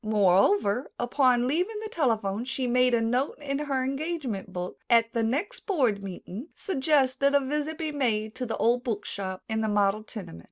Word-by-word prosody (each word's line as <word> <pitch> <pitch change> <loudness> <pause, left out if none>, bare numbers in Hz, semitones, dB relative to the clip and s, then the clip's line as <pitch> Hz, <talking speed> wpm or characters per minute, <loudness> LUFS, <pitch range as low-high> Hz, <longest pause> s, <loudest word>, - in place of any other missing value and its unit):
Moreover, 205 +3 +3
upon 245 0 +2
leaving 360 +10 0
the - - -3
telephone 225 - 0
she 260 +1 -2
made 250 0 +3
a 230 - +1
note 245 +5 0
in 280 -1 -3
her 275 -3 -1
engagement 270 - -3
book: 180 0 -5
"At 230 -1 +4
the 230 - +1
next 310 - -2
board 255 - +1
meeting 195 - -7
suggest 275 -6 +1
that 280 0 +3
a - - +7
visit 300 +3 -2
be 315 -2 -2
made 220 -7 0
to 250 - -3
the 225 - -3
old 240 +2 +2
book 215 -4 -3
shop 190 -2 -5
in 220 0 -1
the 220 - 0
model 205 0 +2
tenement." 200 - -9
245 Hz, 190 wpm, -27 LUFS, 215-280 Hz, -, a